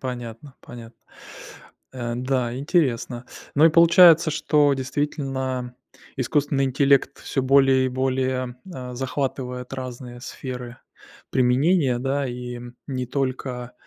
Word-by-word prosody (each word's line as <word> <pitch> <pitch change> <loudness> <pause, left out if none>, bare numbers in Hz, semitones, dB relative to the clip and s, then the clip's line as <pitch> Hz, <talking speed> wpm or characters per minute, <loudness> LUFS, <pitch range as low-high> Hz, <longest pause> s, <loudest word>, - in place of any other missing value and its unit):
Понятно, 125 +1 -7
понятно. 120 -1 -12 1.0
Э, 120 -2 -4
да, 125 -1 -1
интересно. 130 -5 0 0.3
Ну, 150 - +5
и, - - +5
получается, 170 0 +7
что, 150 -1 +2
действительно, 130 -2 -3 0.4
искусственный 140 +1 0
интеллект 135 +1 +2
всё 135 - -2
более 135 -1 +4
и - - 0
более, 130 -1 -1 0.2
э, 125 -1 -7
захватывает 130 -1 -4
разные 125 -2 -7
сферы 125 -2 -7 0.5
применения, 130 +2 +2
да. 135 +2 -1
И, 125 0 -6 0.3
не 130 -2 -3
только, 130 -2 -3
130 Hz, 110 wpm, -23 LUFS, 125-140 Hz, 1.0 s, получается